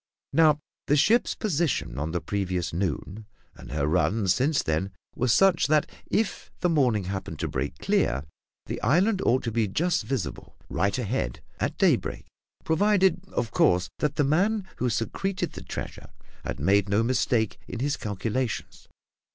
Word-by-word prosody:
Now, 155 -2 +5 0.3
the 145 - +4
ship's 215 - +3
position 170 - -1
on 75 +2 -2
the 85 - -1
previous 90 -4 -2
noon, 95 +4 -3 0.3
and - - -12
her 70 -1 0
run 95 +6 +1
since 140 - +2
then, 80 +5 0 0.2
were 125 - -1
such 175 +7 +4
that 150 0 +3 0.2
if 220 -1 -1
the 180 - +3
morning 125 -10 +2
happened 95 -4 -5
to - - -2
break 65 +2 -3
clear, 70 +3 +1 0.4
the - - -5
island 185 - +3
ought 125 +2 +2
to 115 - -2
be 110 -1 +1
just 170 - +1
visible, 110 - -4
right 100 +5 0
ahead, 105 - -2 0.2
at - - -1
daybreak, - - +1 0.4
provided, 190 +1 +3
of 115 -4 -2
course, 90 +1 +3
that 150 -1 0
the 150 - +2
man 190 +8 +1
who 125 - 0
secreted 185 - -2
the - - -8
treasure - - -7 0.3
had - - -4
made 100 0 +3
no 105 +3 +3
mistake 115 -2 +1
in - - -6
his 140 +3 0
calculations. 110 +4 -3
120 Hz, 160 wpm, -26 LUFS, 95-155 Hz, 0.4 s, Now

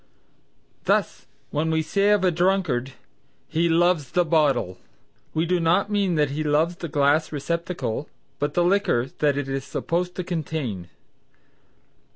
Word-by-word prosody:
Thus - - 0 0.2
when 155 +2 0
we 160 0 +1
say 200 +4 +1
of 210 -2 +3
a 185 - +4
drunkard 170 -8 0 0.5
"He 165 +1 +1
loves 165 -4 +2
the 175 -1 +2
bottle" 150 - +1 0.6
we 160 +1 +1
do 180 +1 +1
not 175 +5 +2
mean 200 -4 +1
that 150 -2 +1
he 155 +2 -2
loves 155 +3 +1
the 170 - -5
glass 145 +1 +2
receptacle, 150 -4 -3 0.3
but 145 0 -2
the 175 - +3
liquor 175 -9 +2
that 145 -2 +2
it 145 -1 -2
is 135 0 -3
supposed 175 +6 -2
to 185 - -3
contain. 150 - -4
160 Hz, 150 wpm, -24 LUFS, 145-175 Hz, 0.6 s, a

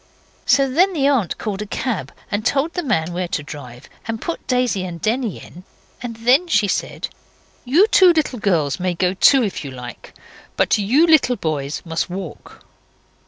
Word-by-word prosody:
So 275 -1 +4
then 355 +9 +2
the 285 -5 0
aunt 255 -10 +1
called 205 -2 -4
a 210 - -5
cab, 200 - -3 0.2
and 205 +1 -1
told 280 +7 0
the 355 - -2
man 175 - -1
where 180 0 -2
to 145 - -3
drive, 130 -4 -10 0.2
and 225 -1 -3
put 335 - -5
Daisy 250 -7 +1
and 175 -2 -6
Denny 225 +3 -1
in, 180 - -13 0.4
and 235 -2 -5
then 250 +10 +3
she 215 -10 +2
said - - -3 0.6
'You 305 +11 +5
two 380 -4 +6
little 305 -7 -1
girls 165 -9 0
may 180 -1 -1
go 180 +1 +1
too, 260 +7 +5
if 200 -6 -3
you 140 - -6
like, 125 -2 -10 0.4
but - - +3
you 250 +11 +3
little 310 -6 +4
boys 150 -6 -3
must 165 +1 -2
walk. 180 -3 -8
215 Hz, 180 wpm, -20 LUFS, 170-270 Hz, 0.6 s, two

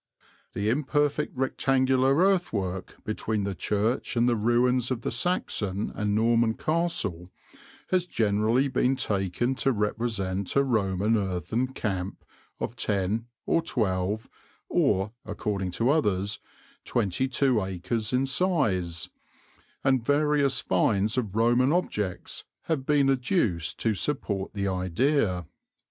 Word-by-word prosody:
"The 100 +2 -2
imperfect 145 +2 0
rectangular 130 0 +2
earthwork 115 - 0
between 110 -1 -2
the 100 0 -2
church 105 +8 -1
and 120 +1 +4
the 120 - +3
ruins 120 +3 +2
of 125 -3 -2
the - - -2
Saxon 110 - -1
and 105 0 -1
Norman 115 0 +3
castle 155 - -1 0.6
has 185 -2 +1
generally 110 - +2
been 130 0 +1
taken 100 +3 0
to 135 - +2
represent 105 -4 -2
a 140 - +5
Roman 105 -4 +1
earthen 100 +5 -1
camp 100 -7 -4 0.3
of 115 - -4
10 105 +1 -1 0.2
or 165 - +2
12 105 - -1 0.4
or 95 +3 +2
(according 100 -2 -3
to 115 +9 +1
others) 105 -9 0 0.5
22 125 +2 +1
acres 95 +4 -2
in 130 +1 +2
size, 115 - 0 0.7
and 130 -3 +2
various 145 0 +2
finds 105 +2 +1
of 110 -6 -2
Roman 120 +4 +3
objects 105 - -2 0.2
have 145 -5 -2
been 145 -2 +4
adduced 125 - 0
to 115 - +2
support 100 - -3
the 100 -1 -1
idea. 95 - +1
115 Hz, 120 wpm, -27 LUFS, 100-135 Hz, 0.7 s, a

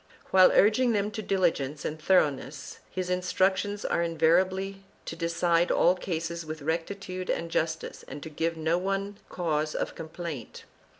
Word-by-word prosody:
While 185 -1 +7
urging 230 +4 +4
them 205 0 0
to 215 +1 -4
diligence 165 -8 0
and 155 0 -4
thoroughness, 150 -5 +1
his 185 -1 -3
instructions 190 +3 0
are - - +1
invari 165 +2 +3
ably 195 +1 -6 0.2
to - - -5
decide 170 0 +1
all 175 - +4
cases 170 -2 -4
with 155 -1 -7
rectitude 185 +4 -3
and 170 0 -2
justice 160 0 -2
and 145 - -8
to 160 - -6
give 165 +2 -1
no 160 +2 +1
one 195 +2 -2
cause 155 -3 -1
of - - -2
complaint. 160 -6 -7
170 Hz, 155 wpm, -28 LUFS, 160-190 Hz, 0.2 s, While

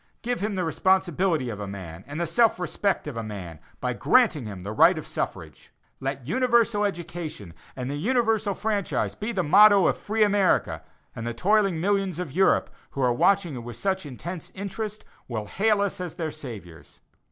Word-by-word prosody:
Give 245 +1 -1
him 205 0 -2
the 185 - -1
responsibility 175 -5 +1
of 105 - -7
a 100 - -5
man 95 -3 -8
and 145 +3 -6
the 170 - 0
self 230 +1 +3
respect 180 +3 -1
of 145 - -5
a 115 - -3
man, 95 -8 -7 0.2
by - - -1
granting 135 -8 +3
him 95 -3 -8
the 100 - -5
right 110 - +5
of - - -5
suffrage. - - -5 0.3
Let 135 -1 -4
universal 235 - +2
education, 170 - -5 0.2
and 125 -1 -4
the 140 +2 -3
universal 220 - +1
franchise 210 -3 -1
be 215 +3 -4
the 190 -5 0
motto 200 +3 +7
of - - +1
free 215 +1 +1
America, 205 -3 +2 0.3
and 115 0 -5
the 120 - -3
toiling 195 - +2
millions 195 -1 0
of 180 -6 -4
Europe, 190 +6 +2 0.2
who 140 - -3
are 125 -1 +3
watching 180 +5 +2
you 125 - -5
with 120 0 -8
such 190 +3 -1
intense 165 +6 -7
interest, 205 +2 -5 0.2
will 110 -4 -4
hail 205 - +1
us 200 -2 -2
as 180 -3 -5
their 160 -3 -3
saviors. 100 - -10
175 Hz, 185 wpm, -25 LUFS, 125-205 Hz, 0.3 s, motto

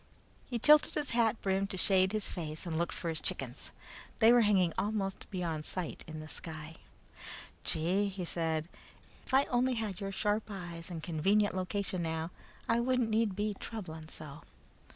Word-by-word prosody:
He 245 - -2
tilted 300 +6 +6
his 295 -2 -1
hat 230 -1 +3
brim 195 0 +1
to 190 - -4
shade 190 0 +4
his 215 -1 -1
face 155 -2 -4
and 165 -2 -3
looked 170 +2 0
for 170 - -3
his 160 -2 -2
chickens. 130 -4 -5 0.5
They 225 +1 +7
were 240 0 +7
hanging 190 -6 +4
almost 200 -2 -2
beyond 170 -5 -2
sight 180 0 -3
in 155 0 -6
the 155 - -7
sky. 160 0 -7 0.9
"Gee!" 180 +6 +2
he 190 -2 -4
said. 160 -2 -1 0.6
"If - - -8
I 270 - +6
only 250 +1 +2
had 215 -4 -3
your 195 0 -3
sharp 210 +2 0
eyes 175 -4 -6
and 165 -3 -6
convenient 195 +5 +2
location 185 0 -1
now, 160 0 -2 0.4
I 230 +1 +3
wouldn't 250 -2 +1
need 215 -3 +2
be 210 +1 0
troubling 160 -8 -6
so." 150 -2 -8
190 Hz, 170 wpm, -32 LUFS, 165-215 Hz, 0.9 s, They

